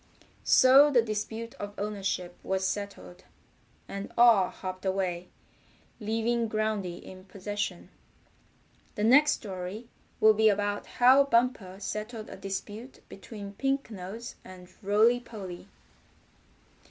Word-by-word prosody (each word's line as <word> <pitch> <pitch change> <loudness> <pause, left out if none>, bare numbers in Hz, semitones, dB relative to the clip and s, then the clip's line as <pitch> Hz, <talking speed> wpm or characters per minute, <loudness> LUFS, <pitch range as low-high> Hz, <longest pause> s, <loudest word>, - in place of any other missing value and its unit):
So 270 +3 +7
the 245 -5 +4
dispute 220 +1 -4
of 205 0 -6
ownership 195 -4 -3
was 190 0 -1
settled, 200 -2 -6 0.6
and 200 0 -6
all 230 -6 +6
hopped 185 -1 -7
away, 185 -2 -2 0.7
leaving 225 +1 -1
Groundy 215 -5 -2
in 185 +1 -12
possession. 195 -1 -5 1.1
The 210 - -2
next 285 +7 +6
story 195 +3 -7 0.3
will 220 0 +6
be 220 +1 +4
about 205 0 -1
how 260 +3 +5
Bumper 230 -7 0
settled 215 +2 -5
a - - -7
dispute 205 +6 -7
between 200 0 -9
Pink 270 +1 -1
Nose 210 +4 -7
and 185 -1 -13
Rolly 215 +4 +3
Polly. 200 -7 -9
210 Hz, 115 wpm, -28 LUFS, 190-230 Hz, 1.1 s, So